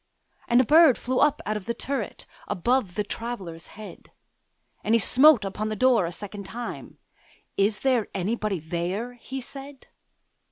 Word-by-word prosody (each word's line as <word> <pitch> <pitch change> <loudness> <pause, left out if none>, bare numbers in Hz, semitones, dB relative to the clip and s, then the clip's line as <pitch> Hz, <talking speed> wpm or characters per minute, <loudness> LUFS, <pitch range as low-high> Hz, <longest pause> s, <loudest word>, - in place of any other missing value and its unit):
And 240 - +4
a - - +6
bird 305 0 +6
flew 255 +1 -2
up 295 -1 +2
out 215 +1 -1
of 200 - -9
the 235 - -3
turret, 275 0 -4 0.2
Above 215 0 0
the 210 - 0
Traveller's 195 -7 -6
head: 215 -1 -11 0.7
And 220 +2 +2
he - - +4
smote 260 0 +6
upon 210 +2 -3
the 215 - -3
door 235 -3 +3
again - - -3
a - - -8
second 205 0 -7
time; 240 +3 -7 0.6
'Is 205 +2 +1
there 255 -5 +1
anybody 205 0 -2
there?' 175 +9 -3
he 260 +2 -7
said. 275 +2 -11
225 Hz, 165 wpm, -25 LUFS, 200-255 Hz, 0.7 s, a